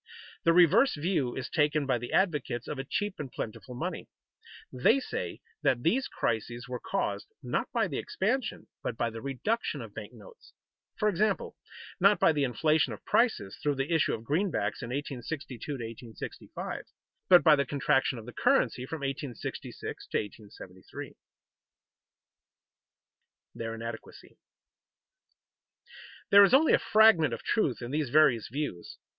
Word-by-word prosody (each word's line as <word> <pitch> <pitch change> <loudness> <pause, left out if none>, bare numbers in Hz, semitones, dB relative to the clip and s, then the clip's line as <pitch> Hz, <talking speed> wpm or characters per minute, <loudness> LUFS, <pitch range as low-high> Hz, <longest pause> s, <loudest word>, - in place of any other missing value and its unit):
The 165 - +6
reverse 180 - +5
view 150 -5 -1
is 130 - -4
taken 150 -1 +1
by 125 -3 +1
the 120 - -6
advocates 150 - 0
of 145 - -4
a - - -2
cheap 205 +8 -3
and 140 -4 -5
plentiful 120 +3 -6
money. - - -4 0.6
They 130 - +4
say - - -5 0.2
that 120 -1 +1
these 255 +10 +2
crises 120 +2 -2
were 125 -1 -4
caused, 195 - -2 0.2
not - - -2
by - - +1
the - - -3
expansion, 265 - -2 0.2
but 115 - -4
by 120 -1 0
the 115 0 -7
reduction 140 - -2
of - - -8
bank - - -8
notes; - - -16 0.4
for 215 - +1
example, 210 +1 0 0.4
not 195 +3 +5
by - - +5
the 150 -2 0
inflation 155 +5 +2
of - - -11
prices 220 - +1
through 145 -1 +1
the 135 +5 -1
issue 160 - +3
of 110 - -10
greenbacks 170 - -1
in 115 - -5
1862 135 -1 -5
to 150 - -3
1865, 115 -2 -7 0.4
but 180 -2 +8
by 155 -3 +7
the 140 - +1
contraction 135 -1 +1
of 110 - -9
the 125 - -9
currency 245 - +2
from 160 0 -5
1866 135 -2 -5
to - - -1
1873. 100 -3 -8
[Sidenote: - - -24 2.4
Their 115 0 -5
inadequacy] 115 0 -9 1.9
There 200 0 +10
is 200 +6 +6
only 310 +3 +5
a - - +5
fragment 215 -7 +5
of - - -12
truth 140 - 0
in 120 - -5
these 150 -2 -1
various 135 -5 +4
views. 140 - -4
145 Hz, 150 wpm, -29 LUFS, 120-190 Hz, 2.4 s, There